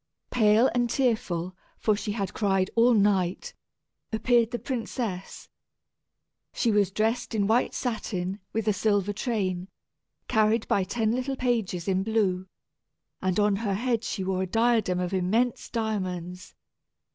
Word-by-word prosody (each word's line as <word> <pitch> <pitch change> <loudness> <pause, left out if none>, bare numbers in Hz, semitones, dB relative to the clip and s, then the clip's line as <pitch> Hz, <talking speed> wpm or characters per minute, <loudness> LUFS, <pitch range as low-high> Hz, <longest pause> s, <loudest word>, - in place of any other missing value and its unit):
Pale 220 +1 +4
and 240 -1 +1
tearful, 185 -9 0 0.2
for 215 - +2
she 205 0 -3
had 200 -3 -3
cried 195 -2 +1
all 235 +1 +5
night, 195 -3 +1 0.6
appeared 235 0 +3
the 240 - -3
princess. 230 -7 -4 1.1
She 235 - +2
was 205 -2 +3
dressed 225 +4 -1
in 205 -2 +2
white 225 +4 +2
satin, 195 -5 -3
with 225 -1 -2
a 215 - +4
silver 205 0 +1
train, 190 -6 -2 0.6
carried 220 +1 +2
by 195 - +2
ten 220 +3 0
little 255 +3 -1
pages 225 -9 -1
in 190 -1 +2
blue, 190 -3 0 0.7
and 185 +1 0
on 205 -1 +3
her 200 -2 -1
head 235 +1 0
she 200 -3 -3
wore 185 0 -1
a 190 - -1
diadem 225 -3 +2
of 180 +1 -2
immense 215 +7 0
diamonds. 185 -6 -4
210 Hz, 140 wpm, -27 LUFS, 190-230 Hz, 1.1 s, all